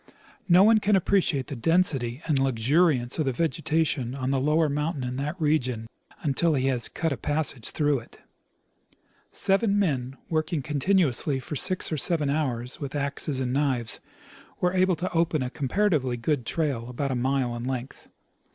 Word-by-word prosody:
No 180 +2 +7
one 220 +1 +6
can 210 0 +2
appreciate 175 -7 +1
the 140 - -6
density 135 -3 +1
and 150 -4 +1
luxuriance 135 +2 +2
of 155 - +1
the 135 - +1
vegetation 155 -3 -1
on 130 -1 -2
the 135 - +1
lower 150 +4 +2
mountain 150 0 -2
in 125 0 -3
that 150 +6 -4
region 130 -7 0 0.4
until 155 +2 +2
he 130 -1 0
has 125 -3 0
cut 165 -2 -2
a 140 - -2
passage 145 -5 0
through 145 -3 +1
it. 115 - -16 1.1
Seven 200 +1 +1
men, 135 -9 -1
working 155 -2 -1
continuously 150 -2 +1
for 150 +4 -6
six 185 +5 +1
or 155 - -1
seven 150 -2 +1
hours 125 -5 -2
with 140 0 -6
axes 140 -1 -2
and 125 -1 -1
knives, 130 -5 0 0.6
were 180 0 +1
able 185 -1 +3
to 180 +3 -4
open 165 -4 +1
a 125 - -4
comparatively 140 -4 0
good 125 0 -1
trail 135 -8 -2
about 135 +2 -3
a - - -1
mile 130 -1 0
in 120 - -5
length. 130 +1 -5
145 Hz, 170 wpm, -26 LUFS, 130-165 Hz, 1.1 s, No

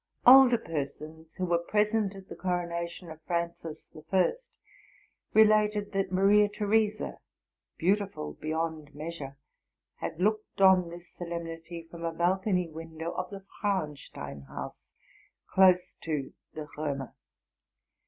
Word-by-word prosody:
Older 255 -1 +9
persons, 160 -1 -6
who 185 - -1
were 170 -1 +2
present 210 +2 +1
at 195 -1 -11
the - - -8
coronation 170 -1 -3
of 160 0 -11
Francis 170 -1 -3
the 155 - -11
First, 190 - 0 0.8
related 215 -1 +4
that 195 -2 -1
Maria 205 +2 +5
Theresa, 210 +1 0 0.6
beautiful 190 - 0
be 155 - -7
yond 160 -2 -3
measure, 150 -3 -6 0.6
had 160 - -5
looked 215 +2 0
on 190 -3 +6
this 175 +1 -10
solemnity 170 -1 -6
ren 170 0 -8
a 165 - 0
balcony 180 +2 +1
window 160 +1 -6
of 185 0 -4
the 195 -1 -9
Frauenstein 150 - -3
house, 70 - -8 0.6
close 185 -1 +4
to 150 -4 -3 0.2
the 155 -1 -5
Romer. 140 -4 -3
175 Hz, 125 wpm, -29 LUFS, 160-195 Hz, 0.8 s, Older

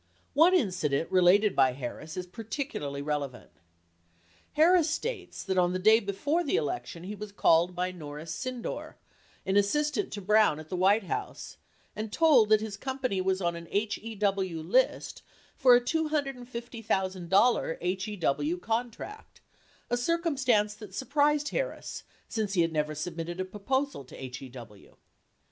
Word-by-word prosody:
One 330 +6 +6
incident 180 - 0
related 185 +3 +4
by 130 -2 +4
Harris 140 +5 -7
is 180 - -3
particularly 185 - -5
relevant. 145 -4 -4 1.0
Harris 330 +1 +5
states 380 +4 -4
that 190 - -1
the 180 0 +2
day 215 +4 +6
before 235 - -1
the 290 - 0
election 265 - -3
he 195 +3 -5
was 210 0 -8
called 175 -2 +3
by 180 +1 -1
Norris 155 -1 -7
Sydnor, 255 +4 -5 0.5
an 190 +1 +2
assistant 240 +3 +1
to 205 - -4
Brown 210 -5 +3
at 155 0 -11
the - - -3
White 195 +4 +3
House, 180 - -5 0.4
and 215 0 -5
told 280 -9 +5
that 215 -1 +5
his 215 -2 -5
company 255 -5 -2
was 190 +1 0
on 170 -1 0
a 170 0 -8
HEW 200 -5 -1
list 250 +11 +1 0.3
for 255 -4 +6
a 245 - +4
$250,000 220 - 0
HEW 160 +5 -1
contract, 235 - -5 0.5
a 240 - +2
circumstance 255 -8 +1
that 210 -3 -11
surprised 290 +3 +1
Harris - - -4 0.2
since 215 -3 -2
he 175 - +4
had 165 -1 -1
never 155 0 -1
submitted 170 +2 -5
a 185 - -1
proposal 260 - -2
to - - -13
HEW. 125 -5 -10
205 Hz, 140 wpm, -29 LUFS, 175-255 Hz, 1.0 s, One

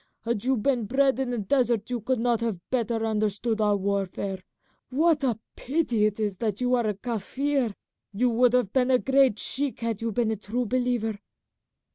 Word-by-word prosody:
Had 230 -3 -2
you 265 0 +2
been 240 0 +1
bred 265 +3 +2
in 265 -2 -1
the 245 - -2
desert 235 +1 +1
you 240 -2 -2
could 255 +4 0
not 235 -1 +1
have 225 -6 -2
better 230 -2 0
understood 215 +1 0
our 205 -1 +3
warfare. 195 -1 -2 0.5
What 300 +2 +2
a 240 -5 +1 0.2
pity 245 -7 +1
it 215 0 -4
is 205 -3 -2
that 215 -3 -1
you 250 0 +1
are 240 -3 +2
a 210 - -1
Kaffir! 245 +3 -2 0.4
You 240 +5 +1
would 245 +1 +3
have 245 -5 +1
been 260 -1 +2
a 255 - +5
great 265 -3 +3
sheik 275 +2 -1
had 230 -2 -2
you 230 0 -1
been 225 +1 0
a - - 0
true 235 +5 -3
believer." 240 -3 -1
235 Hz, 190 wpm, -26 LUFS, 210-255 Hz, 0.5 s, a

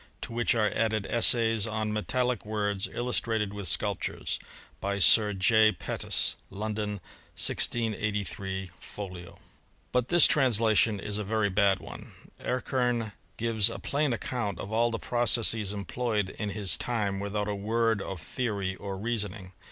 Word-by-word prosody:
To - - -7
which 120 +1 +1
are 105 -3 +1
added 110 -2 0
essays:. 115 -2 +4
on 110 -1 -2
metaUic 125 +2 -1
words, 105 -1 -2
illustrated 115 -4 -1
with 100 -2 -4
sculptures. 100 +3 -1 0.4
By 100 0 -2
Sir 105 +2 +6
J. 110 +3 +4
Pettus. - - 0
London, 105 +1 -3 0.4
1683, 100 -4 0
folio." 90 -4 -9 0.5
But 125 -1 0
this 175 -1 +7
transla 115 -6 +3
tion 105 -1 +3
is 105 +1 -4
a - - -2
very 105 0 0
bad 100 0 +3
one. - - -11 0.3
Erckem 125 -3 -1 0.3
gives 115 -2 +3
a - - -6
plain 145 0 -1
account 115 -5 -3
of 100 - -7
all 115 +2 +2
the 115 - -3
processes 115 -4 +3
employed 105 0 -2
in 105 - -5
his 100 -1 +2
time 105 -5 -2
without 100 +1 -3
a 105 - -2
word 110 +1 0
of 95 -2 -6
theory 100 - -3
or 100 -1 -6
reasoning. 105 -3 -4
105 Hz, 145 wpm, -28 LUFS, 100-115 Hz, 0.5 s, this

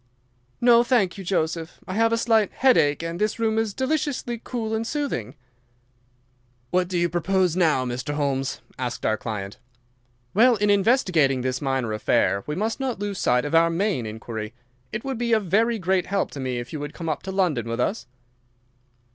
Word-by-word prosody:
"No, 240 -1 +6
thank 235 -8 +2
you, - - -6
Joseph. 165 -2 -2
I 185 - -4
have 225 +2 +2
a 230 - +2
slight 225 -3 +2
headache 165 - +3
and 165 +2 -4
this 215 0 0
room 225 -1 +1
is 225 -2 0
deliciously 260 -4 -1
cool 225 -3 -3
and 225 +1 -1
soothing." 235 - -3 1.4
"What 180 0 +2
do 180 -1 -2
you 175 0 +2
propose 180 0 +1
now, 155 -8 +2
Mr. 125 +4 -3
Holmes?" 135 -2 -1 0.2
asked 125 -1 -3
our 110 - +2
client. 105 -3 -6 0.7
"Well, 240 +3 +5
in 205 -1 +2
investigating 185 - +3
this 130 0 -2
minor 135 -5 -1
affair 110 -2 +1
we 150 - -2
must 220 +7 -2
not 265 -3 -2
lose 200 -1 -4
sight 125 +1 +2
of 145 - -4
our 165 0 +5
main 170 - -1
inquiry. 110 +1 -6 0.4
It 215 - -4
would 265 -3 -3
be 235 -1 +1
a 220 - +5
very 220 +5 +1
great 185 -1 0
help 195 0 -1
to 140 - -8
me 130 -2 -2
if 120 +3 -6
you 155 - -3
would 145 0 -6
come 165 - -6
up 155 -3 -1
to 190 - -6
London 165 - 0
with 115 - -3
us." 120 - -1
180 Hz, 190 wpm, -24 LUFS, 130-220 Hz, 1.4 s, No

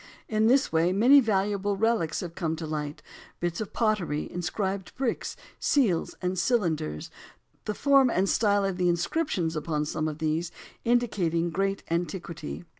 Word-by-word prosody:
In 215 0 +2
this 265 +3 +3
way 165 +2 +3
many 245 +9 +7
valuable 205 -3 0
relics 215 -7 +1
have 175 -2 -6
come 165 -3 -2
to 160 0 -6
light; 150 -1 -4 0.4
bits 175 +2 -2
of 215 - -5
pottery, 205 -10 0
inscribed 190 +2 -3
bricks, 255 -3 -2 0.2
seals 225 - +1
and 180 0 0
cylinders, 165 - 0 0.5
the 210 - -2
form 275 -2 +4
and 195 -3 +1
style 205 -1 +2
of 195 -2 -2
the 180 -1 +2
inscriptions 175 - 0
upon 155 -1 -1
some 155 +1 -2
of 155 -1 -4
these 160 +2 -1 0.3
indicating 185 -9 +1
great 195 +3 -1
antiquity. 170 - -3
185 Hz, 150 wpm, -27 LUFS, 165-215 Hz, 0.5 s, many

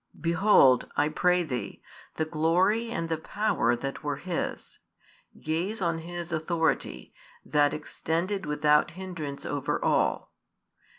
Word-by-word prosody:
Behold, 165 -6 +4
I 145 +1 +3
pray 180 +3 +2
thee, 125 -7 -5 0.3
the 160 - 0
glory 175 +9 +1
and 165 -7 -3
the 160 -1 -2
power 160 - 0
that 135 +3 -5
were 145 -1 -1
His: 170 +4 -5 0.6
gaze 175 +8 -2
on 170 -3 0
His 175 +1 -6
authority, 160 0 -1 0.3
that 145 -1 +3
extended 170 +4 -3
without 150 +1 +3
hindrance 165 -7 -6
over 145 -2 -1
all. - - +1
165 Hz, 120 wpm, -28 LUFS, 150-180 Hz, 0.6 s, Behold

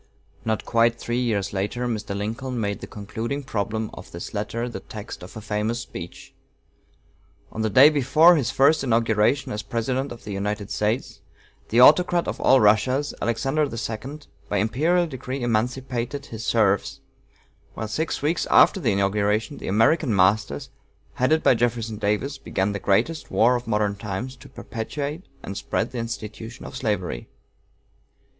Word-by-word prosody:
Not 110 -1 -1
quite 115 0 +2
three 120 +1 -2
years 100 -5 -1
later 105 +6 -2
Mr. 105 -4 -3
Lincoln 120 +5 -3
made 100 -2 -2
the - - -7
concluding 110 +7 -5
problem 110 -2 -3
of 95 - -10
this 85 - -7
letter 110 +3 -3
the 120 - -6
text 105 -4 -9
of 90 +4 -10
a - - -6
famous 105 +3 -2
speech. 85 -9 -9 1.2
On 110 - -4
the 110 - +1
day 130 +8 +8
before 155 +5 +5
his 135 -7 0
first 140 +3 +4
inauguration 115 +2 +2
as 105 - -3
President 130 +5 -2
of 120 - -9
the 105 - -7
United 100 +1 -3
States, 110 +4 -1 0.5
the 115 - +3
"Autocrat 175 +5 +6
of - - -4
all - - +6
the 135 - +5
Russias," 120 +7 +3
Alexander 135 +6 +1
II, 120 +3 -5 0.3
by 105 - 0
imperial 155 - +2
decree 130 -3 -5
emancipated 125 +3 -2
his 110 -3 -7
serfs; 100 -5 +1 0.8
while 110 - -4
six 155 +7 -2
weeks 160 +3 0
after - - +6
the - - +1
inauguration 105 +6 0
the - - -7
"American 115 - +3
masters," 95 -5 +1 0.4
headed 155 +6 +2
by - - +6
Jefferson 115 -2 -1
Davis, 105 +7 -1
began 95 +2 -1
the 100 - -3
greatest 115 - 0
war 120 +3 +4
of 120 -1 -4
modern 105 -2 +1
times 105 +5 -5
to - - -14
perpetuate 145 - -5 0.2
and 100 - -6
spread 115 +3 -2
the 125 - -4
institution 115 0 -6
of - - -8
slavery. 100 - -2
115 Hz, 160 wpm, -24 LUFS, 105-130 Hz, 1.2 s, day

